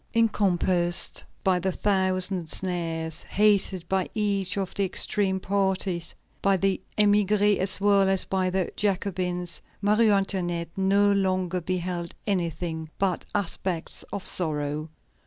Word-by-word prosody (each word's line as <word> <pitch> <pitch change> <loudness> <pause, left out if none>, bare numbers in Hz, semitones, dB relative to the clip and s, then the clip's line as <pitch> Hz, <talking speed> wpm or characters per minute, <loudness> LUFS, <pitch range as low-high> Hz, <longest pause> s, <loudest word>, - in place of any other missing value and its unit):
Encompassed 185 -5 +2 0.2
by 190 -1 +3
a 190 +2 -1
thousand 185 -3 0
snares, 165 -3 0
hated 200 -4 +1
by 190 -1 0
each 200 -3 0
of 195 -2 -3
the 200 - 0
extreme 190 0 +1
parties, 190 -3 -1 0.3
by 195 -1 +3
the 195 0 0 0.2
émigrés 205 0 +3
as 190 0 +3
well 200 -1 +4
as 190 -1 +2
by 190 -1 0
the 185 0 -1
Jacobins, 180 -4 -2 0.2
Marie 215 +2 +3
Antoinette 175 -4 0
no 200 +1 +3
longer 185 -2 0
beheld 175 -1 -3
anything 170 -4 -2
but 190 -2 -1
aspects 185 -3 -2
of 195 - -5
sorrow. 150 -2 -1
190 Hz, 120 wpm, -26 LUFS, 175-200 Hz, 0.3 s, well